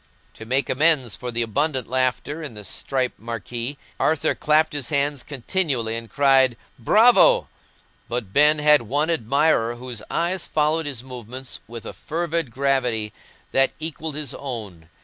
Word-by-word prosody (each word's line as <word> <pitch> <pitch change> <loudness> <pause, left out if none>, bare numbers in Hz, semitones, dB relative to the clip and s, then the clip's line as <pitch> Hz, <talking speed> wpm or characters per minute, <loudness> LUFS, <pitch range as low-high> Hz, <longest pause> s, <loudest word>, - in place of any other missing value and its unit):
To 110 - -11
make 135 +3 +1
amends 135 -6 +2
for 125 - -6
the 120 0 0
abundant 130 +3 -1
laughter 130 +5 -1
in 145 -8 -7
the 105 - -7
striped 130 +6 -2
marquee, 115 +4 -4 0.2
Arthur 160 -2 +2
clapped 155 +1 +2
his 145 -4 -1
hands 145 -2 0
continually 135 -4 -1
and 115 -1 -6
cried 135 -3 +4 0.2
"Bravo!" 245 - +5 0.6
But 115 -5 -4
Ben 150 +1 +5
had 150 -1 +5
one 145 +8 0
admirer 135 -3 +1
whose 120 -2 -7
eyes 175 +2 -1
followed 155 +1 +1
his 130 -4 -3
movements 125 0 -7
with 115 0 -9
a - - -6
fervid 165 -2 -2
gravity 125 -4 0 0.4
that 135 0 +3
equalled 160 -1 -4
his 150 -4 -3
own. 105 - -7
135 Hz, 150 wpm, -23 LUFS, 120-150 Hz, 0.6 s, Bravo